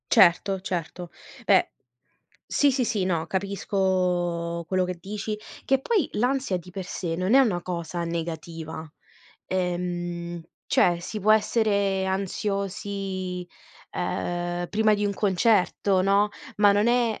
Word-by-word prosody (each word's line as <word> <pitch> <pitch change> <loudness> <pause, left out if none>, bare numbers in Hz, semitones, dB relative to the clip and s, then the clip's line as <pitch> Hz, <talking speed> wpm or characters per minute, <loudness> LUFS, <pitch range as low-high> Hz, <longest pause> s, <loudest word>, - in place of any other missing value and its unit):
Certo, 190 +2 +5
certo. 180 -1 -4 0.4
Beh - - +4 0.8
sì, 285 - +3
sì, 260 -1 +1
sì, 210 -3 0
no. 170 -3 0
Capisco 180 -3 -1
quello 185 -1 +2
che 180 0 -4
dici. 210 +3 -4 0.3
Che 270 0 +2
poi 395 - +1
l'ansia 250 -3 0
di 180 +1 -12
per 190 0 -5
sé 170 -2 -3
non 185 +6 +1
è 270 - +8
una 210 -10 +2
cosa 170 -1 -4
negativa, 165 -1 -5 0.6
ehm, 175 -1 -2 0.3
cioè, 175 -1 +3
si 215 +5 -5
può 215 +3 +5
essere 200 -3 +2
ansiosi, 195 -1 -3 0.5
ehm, 175 0 -2
prima 215 0 +3
di 205 0 -1
un 205 - +1
concerto, 195 -1 +2
no, 200 +2 +3 0.3
ma 205 -1 +6
non 205 +2 +2
è 235 -2 +2
190 Hz, 130 wpm, -26 LUFS, 175-205 Hz, 0.8 s, è